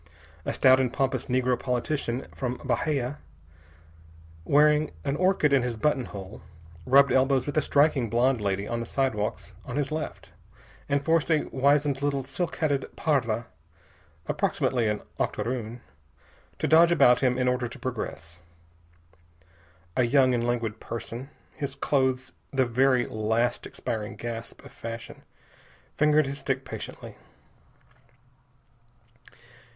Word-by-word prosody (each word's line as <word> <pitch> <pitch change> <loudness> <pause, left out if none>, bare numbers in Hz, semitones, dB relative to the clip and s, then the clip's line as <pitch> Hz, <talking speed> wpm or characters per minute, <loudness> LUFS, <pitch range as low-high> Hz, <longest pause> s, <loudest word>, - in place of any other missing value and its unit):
A - - -1
stout 130 -1 +6
and 130 -2 +1
pompous 135 -1 -1
negro 125 -1 +1
politician 125 0 -2
from 125 -2 -3
Bahia, 140 -3 -1 1.3
wearing 150 +1 +4 0.2
an 140 - 0
orchid 180 -4 +2
in 135 - +5
his 120 -2 -3
button 130 +1 +1
hole, 95 -2 -9 0.5
rubbed 140 +2 +6
elbows 130 0 +3
with 145 - -4
a 155 - +4
striking 140 -6 +2
blonde 120 +1 +2
lady 100 0 -1
of 120 - -2
the 115 - -5
sidewalks 115 -7 -2
on 120 - -6
his 145 0 -1
left, 155 0 -5 0.6
and 140 0 0
forced 165 -1 +2
a 155 -2 +3
wizened 140 0 +2
little 140 -1 0
silk 160 +6 -3
hatted 145 -4 0
parda 120 -7 0 0.8
approximately 120 -4 0
an 105 0 -2 0.2
octoroon 115 +1 -3 0.8
to - - -1
dodge 170 +2 +6
about 125 -7 +5
him 125 -2 +2
in 125 -1 +1
order 125 -1 +1
to 125 - -10
progress. 105 -9 -6 1.6
A - - +3
young 130 +1 +4
and 120 -1 0
languid 115 -3 -1
person, 120 +3 -6 0.2
his 140 -2 -4
clothes 130 -2 0 0.2
the 135 -2 +2
very 125 +1 +3
last 110 +3 -1
expiring 105 -2 -4
gasp 115 +2 -7
of 140 - -12
fashion, 115 -3 -8 0.7
fingered 150 0 +4
his 140 +1 -5
stick 135 -1 -2
patiently. - - -8
130 Hz, 130 wpm, -27 LUFS, 120-140 Hz, 1.6 s, stout